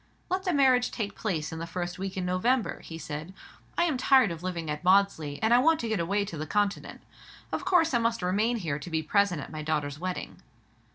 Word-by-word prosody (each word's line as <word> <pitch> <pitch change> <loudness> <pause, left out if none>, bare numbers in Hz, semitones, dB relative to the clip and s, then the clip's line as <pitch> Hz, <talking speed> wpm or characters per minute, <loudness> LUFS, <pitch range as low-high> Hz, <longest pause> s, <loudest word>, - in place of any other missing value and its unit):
"Let 375 +1 -1
the 365 - +2
marriage 260 -4 +4
take 205 -3 -4
place 160 -8 -2
in 160 - -5
the 165 - -5
first 175 +1 -4
week 195 0 -4
in 185 - -1
November," 220 +7 +1
he 165 - -9
said. 155 +3 -7 0.4
"I - - +4
am 320 -6 +1
tired 260 -5 +4
of 165 -1 -6
living 175 -3 -4
at 150 +1 -4
Maudesley, 180 -6 +3
and 220 +2 +4
I 240 - +7
want 320 +4 +4
to 235 - -3
get 220 -4 0
away 200 +4 0
to 165 -6 -7
the 155 - -4
Continent. 205 +3 -1 0.5
Of - - -3
course 330 -5 +3
I 240 - +4
must 230 -3 0
remain 210 +6 +1
here 155 -8 -3
to 145 - -8
be 160 -1 -1
present 195 -1 +2
at - - -10
my 155 -1 -5
daughter's 150 -2 -2
wedding." 185 +1 -5
185 Hz, 230 wpm, -28 LUFS, 160-235 Hz, 0.5 s, I